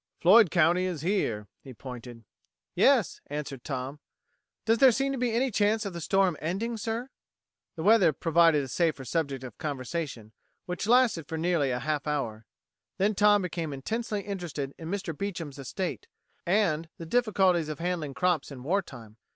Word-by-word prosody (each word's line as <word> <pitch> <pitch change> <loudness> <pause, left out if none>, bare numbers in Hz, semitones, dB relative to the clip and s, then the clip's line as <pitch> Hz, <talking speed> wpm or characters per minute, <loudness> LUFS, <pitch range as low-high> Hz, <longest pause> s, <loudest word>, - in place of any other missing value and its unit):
Floyd 195 +3 +7
County 175 +2 +3
is 175 -6 -3
here." 150 - -1
He 130 -3 -11
pointed. 120 -2 -9 0.5
"Yes," - - +3
answered 145 -3 -5
Tom. 135 +1 -5 0.7
"Does 225 0 +3
there 265 -2 +8
seem 275 +3 0
to 270 - -2
be 245 -1 +1
any 250 +3 +1
chance 210 +2 +1
of 195 - -4
the 170 - -6
storm 190 +1 +2
ending, 195 +9 -2
sir?" 225 +4 -3 0.7
The 160 - -5
weather 205 -5 +6
provided 165 0 +3
a - - -6
safer 155 -1 0
subject 140 -1 -2
of 125 -4 -10
conversation, 140 -5 -4 0.3
which 180 +3 -4
lasted 235 - +3
for 160 - -4
nearly 165 -4 +1
a 125 - 0
half 150 +3 -2
hour. 115 -7 -3 0.5
Then 205 +3 +2
Tom 205 0 +4
became 170 -3 -3
intensely 215 - -3
interested 170 -9 -5
in 160 -1 -7
Mr. 190 -4 -3
Beecham's 165 -7 -5
estate, 180 +7 -4 0.4
and 170 -5 +1
the 165 - -7
difficulties 190 -6 +2
of 155 - -4
handling 165 -5 -3
crops 175 +3 +1
in 130 -3 -9
war 190 +8 +1
time. 115 - -13
170 Hz, 165 wpm, -28 LUFS, 140-200 Hz, 0.7 s, there